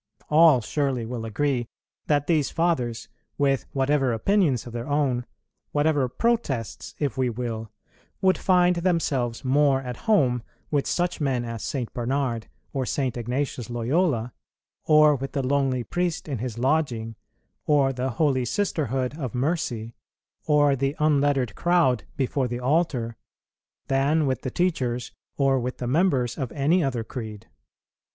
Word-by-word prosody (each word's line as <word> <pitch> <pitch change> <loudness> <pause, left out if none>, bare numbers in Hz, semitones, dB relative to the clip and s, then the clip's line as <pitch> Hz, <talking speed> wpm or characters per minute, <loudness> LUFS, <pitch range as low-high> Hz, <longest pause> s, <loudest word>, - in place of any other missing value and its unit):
All 155 -4 +6
surely 135 -1 -1
will 115 -1 -5
agree 120 +2 -1 0.4
that 145 -1 +2
these 155 -4 +2
Fathers, 135 -9 -1 0.3
with 140 -2 +1
whatever 135 -2 +1
opinions 150 - +2
of 120 - -9
their 120 +1 -4
own, 135 -4 0 0.5
whatever 145 -3 +2
protests, 135 - -1
if 140 -3 -2
we 130 -1 +2
will, 115 -2 -4 0.5
would 190 -1 +3
find 180 -1 +3
themselves 145 -10 0
more 135 0 +3
at 125 -2 -5
home 130 - +3 0.3
with 145 -2 +1
such 175 -2 -1
men 130 -4 0
as 115 -1 -5
St. 125 -5 -3
Bernard 120 -2 -1 0.3
or 135 -2 -1
St. 130 -1 -1
Ignatius 125 0 -3
Loyola, 120 0 0 0.5
or 155 -1 +6
with 135 0 -5
the 135 -3 -1
lonely 135 -2 +1
priest 175 +3 -2
in 135 -6 -3
his 120 -1 -4
lodging, 125 -4 0 0.5
or 140 -3 +3
the 130 +1 -2
holy 130 0 +1
sisterhood 135 - -1
of 130 -4 -4
mercy, 125 -5 -1 0.5
or 145 -2 +4
the 135 +2 -1
unlettered 145 -5 +2
crowd 170 -9 +2
before 135 -1 0
the 120 0 -4
altar, 125 -5 0 0.7
than 140 +4 +2
with 130 -1 -1
the 130 - -3
teachers 125 -7 -1 0.3
or 135 -1 +3
with 125 +1 -4
the 125 - -4
members 135 -3 +1
of 130 -3 -3
any 155 +5 +2
other 125 -5 -1
creed. 110 -4 -7
135 Hz, 145 wpm, -25 LUFS, 120-150 Hz, 0.7 s, All